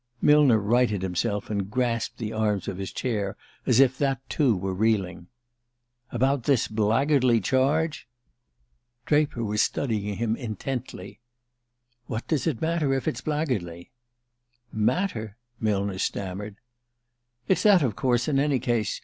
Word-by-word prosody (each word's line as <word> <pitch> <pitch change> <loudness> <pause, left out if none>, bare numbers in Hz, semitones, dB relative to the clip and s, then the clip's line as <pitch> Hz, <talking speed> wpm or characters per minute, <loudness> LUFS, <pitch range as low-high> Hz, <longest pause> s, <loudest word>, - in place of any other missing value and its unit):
Millner 145 -5 +5
righted 110 -1 +1
himself, 95 +3 -2
and 100 -2 -2
grasped 120 -1 -1
the 110 -1 -4
arms 105 -3 0
of 95 - -4
his 95 - -4
chair 105 -5 -2 0.3
as 125 -2 +4
if 130 -1 +4
that 135 -2 +1
too 130 - +2
were 95 +1 -3
reeling. 95 -4 0 0.8
"About 130 +1 0
this 135 -5 +2
blackguardly 120 +3 +2
charge?" 140 - 0 1.0
Draper 145 -5 +1
was 105 0 0
studying 105 -6 -1
him 115 -1 0
intently. 115 -4 -6 0.9
"What 115 0 -4
does 155 -4 0
it 140 -9 -1
matter 160 -4 +1
if 135 - -3
it's 125 - -2
blackguardly?" 125 - -3 0.8
"Matter 110 - -1
?" - - -54
Millner 100 -3 -1
stammered. 100 +2 -3 0.9
"It's 185 -2 +2
that, 200 -6 +5
of 115 -7 0
course, 125 -2 +1
in 140 -3 +2
any 140 -1 +2
case. 120 -4 -1
115 Hz, 135 wpm, -26 LUFS, 105-135 Hz, 1.0 s, Millner